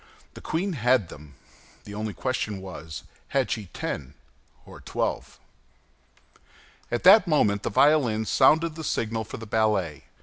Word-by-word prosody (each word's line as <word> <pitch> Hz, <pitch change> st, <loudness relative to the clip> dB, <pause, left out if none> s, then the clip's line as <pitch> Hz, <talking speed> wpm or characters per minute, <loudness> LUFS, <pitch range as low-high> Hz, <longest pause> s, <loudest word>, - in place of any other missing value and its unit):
The -, -, -11 dB
queen 180 Hz, +4 st, -2 dB
had 125 Hz, -, +2 dB
them. 75 Hz, -2 st, -13 dB, 0.5 s
The 105 Hz, -, -10 dB
only 105 Hz, 0 st, -4 dB
question 110 Hz, -6 st, -2 dB
was, 90 Hz, -4 st, -8 dB, 0.2 s
had 135 Hz, -2 st, 0 dB
she 105 Hz, -4 st, -3 dB
ten 70 Hz, -4 st, -6 dB, 0.5 s
or -, -, -13 dB
twelve? -, -, -3 dB, 1.5 s
At 120 Hz, -, -2 dB
that 195 Hz, +1 st, +8 dB
moment 105 Hz, -11 st, +2 dB
the -, -, -2 dB
violins 120 Hz, -5 st, +3 dB
sounded 160 Hz, +4 st, +4 dB
the 160 Hz, 0 st, -8 dB
signal 115 Hz, -5 st, -2 dB
for -, -, -8 dB
the 115 Hz, -, -8 dB
ballet. 105 Hz, -9 st, 0 dB
110 Hz, 140 wpm, -25 LUFS, 100-140 Hz, 1.5 s, that